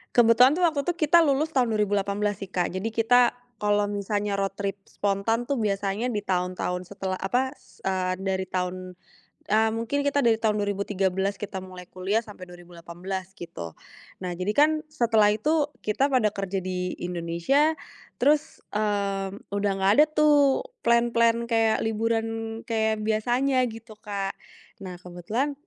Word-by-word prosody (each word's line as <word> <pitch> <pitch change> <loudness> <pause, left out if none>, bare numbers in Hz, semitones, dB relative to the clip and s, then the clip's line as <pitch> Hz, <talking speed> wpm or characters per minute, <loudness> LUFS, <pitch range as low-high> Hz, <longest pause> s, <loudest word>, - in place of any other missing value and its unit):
Kebetulan 240 +2 +6
tuh - - +1
waktu 305 -3 0
itu 350 - +2
kita 340 +2 +6
lulus 300 +1 +1
tahun 245 -4 +3
2018 205 -1 0
sih, 195 - -10
Kak, 180 -2 0
jadi 190 +4 -2
kita 230 +2 +4 0.4
kalau 205 0 +2
misalnya 205 0 -2
road 195 0 -1
trip 200 -1 -2
spontan 205 +4 -1
tuh 280 - 0
biasanya 205 +1 -1
di 210 - -1
tahun-tahun 180 0 -1
setelah, 190 -2 -3
apa, 250 +7 0
s - - -24
eee, 185 -1 0
dari 190 -1 -1
tahun 180 0 -2 0.7
e 215 - +3
mungkin 230 +5 -1
kita 285 -1 +1
dari 225 -2 +4
tahun 215 -2 +1
2013 200 -1 -1
kita 200 -2 -5
mulai 185 -1 -10
kuliah, 200 +5 -1
sampai 195 -4 -11
2018, 175 +2 -8
gitu. 125 - -8 0.5
Nah, 180 - -2
jadi 185 +4 -2
kan 300 +2 +6 0.2
setelah 230 -7 +3
itu 295 +6 +1 0.2
kita 240 +6 +1
pada 250 -6 +2
kerja 195 -1 -4
di 180 -1 -3
Indonesia, 175 - +1 0.4
terus, 300 +4 +1
eee, 200 -2 -1 0.2
udah 200 0 0
nggak 195 +1 +4
ada - - +9
tuh, 300 - +3 0.2
plan-plan 235 0 +3
kayak 225 -1 +2
liburan 225 +1 0 0.4
kayak 220 -1 0
biasanya, 245 +5 +1
gitu, 225 0 -11
Kak. 200 -2 -3 0.5
Nah, 185 -2 -7
kebetulan 185 - -3
210 Hz, 150 wpm, -26 LUFS, 190-235 Hz, 0.7 s, ada